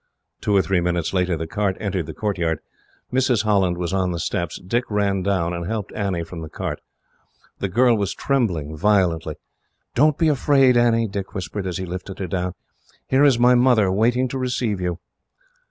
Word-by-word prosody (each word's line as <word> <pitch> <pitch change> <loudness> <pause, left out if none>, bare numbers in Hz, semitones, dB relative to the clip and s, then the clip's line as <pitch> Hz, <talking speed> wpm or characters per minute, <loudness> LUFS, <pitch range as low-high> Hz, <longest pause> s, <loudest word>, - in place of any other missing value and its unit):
Two 105 - +1
or 95 - +4
three 95 -2 +1
minutes 85 -1 -1
later, 90 -2 +1
the 80 - -4
cart 95 +2 -1
entered 95 -6 -2
the 80 - -6
courtyard. 85 -7 -1 0.6
Mrs. 125 -4 +2
Holland 95 -5 +2
was 90 +1 -3
on 95 -2 +1
the 85 - -3
steps. 85 0 -2
Dick 115 +7 -1
ran 100 -2 0
down, 90 -3 0
and 85 -1 -4
helped 110 -2 -4
Annie 95 -5 -2
from 85 0 -8
the 80 - -7
cart. - - -5 0.8
The 100 - -2
girl 120 +4 +4
was 100 -3 -2
trembling 90 - -1
violently. 85 -4 +1 0.6
"Don't 150 +3 +3
be 165 - +2
afraid, 135 -3 +4
Annie," 115 -1 +3
Dick 100 0 -6
whispered, 95 +1 -4
as 90 - -3
he 95 - -4
lifted 90 +2 -6
her 95 - -3
down. 90 0 -3 0.5
"Here 135 +2 +3
is 140 -4 +5
my 125 +1 +5
mother, 120 -6 +4
waiting 120 +6 +2
to 135 - -4
receive 120 -6 -1
you. 90 -2 -2
100 Hz, 185 wpm, -22 LUFS, 90-120 Hz, 0.8 s, is